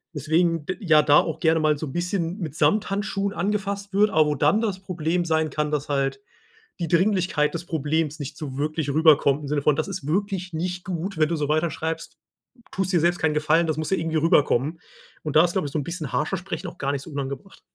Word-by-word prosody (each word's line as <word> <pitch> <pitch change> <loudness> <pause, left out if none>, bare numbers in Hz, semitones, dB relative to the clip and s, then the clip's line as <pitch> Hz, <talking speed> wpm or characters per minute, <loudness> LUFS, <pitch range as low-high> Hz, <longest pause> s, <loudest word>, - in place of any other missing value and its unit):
Deswegen 160 +2 +1
d 185 - -3
ja 160 -6 +5
da 145 0 +6
auch 160 - -2
gerne 160 -2 +3
mal 155 -1 +2
so 155 - -5
'n - - -7
bisschen 175 0 -2
mit 155 -6 -5
Samthandschuhen 200 +1 0
angefasst 200 +1 -2
wird. 205 +1 +4
Aber 155 -1 +4
wo 150 - 0
dann 150 +10 +3
das 205 -5 -2
Problem 175 -2 -1
sein 160 -1 +1
kann, 150 -1 -2
dass 150 -1 -2
halt 140 +4 -1 0.6
die 170 - -2
Dringlichkeit 175 -4 +2
des 170 0 -5
Problems 155 0 -1
nicht 145 0 -6
so 135 -4 -6
wirklich 155 0 -2
rüberkommt 150 -2 +4
im - - -5
Sinne 145 0 0
von, 150 - +4
das 155 - -1
ist 190 -7 -5
wirklich 185 +1 -1
nicht 180 +2 -3
gut, 185 0 -4
wenn 155 -1 +3
du 170 - 0
so 150 -1 -1
weiterschreibst, 160 +1 -2 0.4
m 240 - -24
tust 190 0 -2
dir 175 - +3
selbst 175 +2 +2
keinen 160 -1 +1
Gefallen, 160 +2 +2
das 155 - 0
muss 155 -1 -2
ja 190 - +3
irgendwie 160 0 -2
rüberkommen. 150 -1 +2 0.4
Und 155 -1 -4
da 155 - +8
ist, 175 - -1
glaube 185 -6 -1
ich, 140 - -9
so 155 - 0
'n - - -3
bisschen 170 -4 -5
harscher 160 +6 0
Sprechen 185 0 -5
auch 175 0 -9
gar 140 +1 -1
nicht 140 - -3
so - - -11
unangebracht. 140 +6 -6
160 Hz, 235 wpm, -24 LUFS, 150-180 Hz, 0.6 s, da